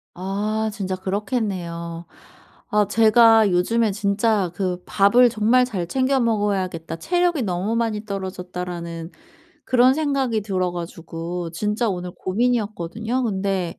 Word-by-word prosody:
아 210 Hz, +4 st, -2 dB
진짜 190 Hz, -3 st, -3 dB
그렇겠네요. 185 Hz, -4 st, -3 dB, 0.7 s
아 210 Hz, -2 st, +3 dB
제가 225 Hz, 0 st, +5 dB
요즘에 215 Hz, +5 st, +2 dB
진짜 200 Hz, -2 st, +1 dB
그 180 Hz, -2 st, -2 dB
'밥을 235 Hz, +5 st, +5 dB
정말 230 Hz, +3 st, +3 dB
잘 185 Hz, -8 st, -4 dB
챙겨 265 Hz, +3 st, +1 dB
먹어야겠다, 195 Hz, -8 st, -1 dB
체력이 350 Hz, -, +1 dB
너무 190 Hz, +4 st, -1 dB
많이 220 Hz, -2 st, -1 dB
떨어졌다.'라는 180 Hz, -3 st, -5 dB, 0.5 s
그런 255 Hz, +1 st, +4 dB
생각이 270 Hz, -8 st, 0 dB
들어 185 Hz, -3 st, -1 dB
가지고 170 Hz, 0 st, -6 dB
진짜 210 Hz, +6 st, -1 dB
오늘 180 Hz, -2 st, -3 dB
고민이었거든요. 220 Hz, +1 st, -1 dB
근데 195 Hz, -4 st, -2 dB
200 Hz, 285 characters per minute, -22 LUFS, 180-230 Hz, 0.7 s, 제가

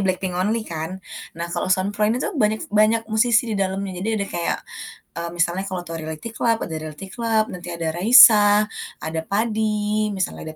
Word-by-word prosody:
BLACKPINK 185 Hz, -1 st, -1 dB
only 220 Hz, +3 st, 0 dB
kan? 165 Hz, +1 st, -5 dB, 0.4 s
Nah 170 Hz, -, -3 dB
kalau -, -, -2 dB
Sound 185 Hz, +2 st, +1 dB
Pro 210 Hz, +1 st, +1 dB
ini 230 Hz, -, +1 dB
tuh 330 Hz, +11 st, -2 dB
banyak 215 Hz, -7 st, -1 dB
banyak 215 Hz, +2 st, +3 dB
musisi 235 Hz, +1 st, +2 dB
di -, -, -1 dB
dalamnya. 190 Hz, -1 st, -3 dB
Jadi 205 Hz, -, -3 dB
ada 200 Hz, -1 st, -2 dB
kayak, 170 Hz, -1 st, -1 dB, 0.6 s
eee, 170 Hz, 0 st, -4 dB
misalnya 175 Hz, +2 st, 0 dB
kalau 185 Hz, -2 st, -4 dB
tau 165 Hz, -, -6 dB
Reality 160 Hz, +8 st, -7 dB
Club, 230 Hz, -1 st, +1 dB
ada 160 Hz, -, -6 dB
Reality 155 Hz, +4 st, -8 dB
Club, 225 Hz, -2 st, +1 dB
nanti 175 Hz, -1 st, -9 dB
ada 170 Hz, -1 st, -4 dB
Raisa, 210 Hz, 0 st, +7 dB, 0.3 s
ada 160 Hz, 0 st, -4 dB
Padi, 215 Hz, 0 st, -1 dB
misalnya 190 Hz, -2 st, -3 dB
ada -, -, -18 dB
200 Hz, 190 wpm, -22 LUFS, 175-220 Hz, 0.6 s, Raisa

